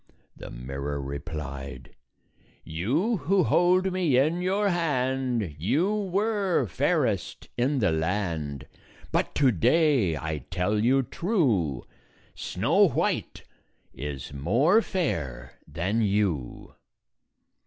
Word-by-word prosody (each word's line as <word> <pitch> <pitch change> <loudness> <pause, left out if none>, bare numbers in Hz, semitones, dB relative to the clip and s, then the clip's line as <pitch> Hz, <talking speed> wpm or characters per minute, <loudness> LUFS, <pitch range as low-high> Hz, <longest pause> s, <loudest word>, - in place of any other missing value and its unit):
The - - -9
mirror 70 +4 -5
replied, 70 -2 -6 0.7
"You 140 - 0
who 185 +4 +2
hold 185 +1 +3
me 170 -9 +2
in 155 +7 +2
your 200 +3 +1
hand, 130 - -1
You 155 - +1
were 200 - 0
fairest - - -1
in 135 +4 +1
the 105 -8 +2
land; 80 -4 -2 0.5
But - - 0
to 135 -3 +4
day, 120 - +3
I 80 0 -3
tell 90 +5 0
you 135 +3 +3
true, 120 - 0 0.5
Snow - - +2
White - - -2 0.5
is 70 0 -6
more 120 - +3
fair 85 - -3
than 90 +9 -1
you." 100 - -1
110 Hz, 100 wpm, -26 LUFS, -, 0.7 s, to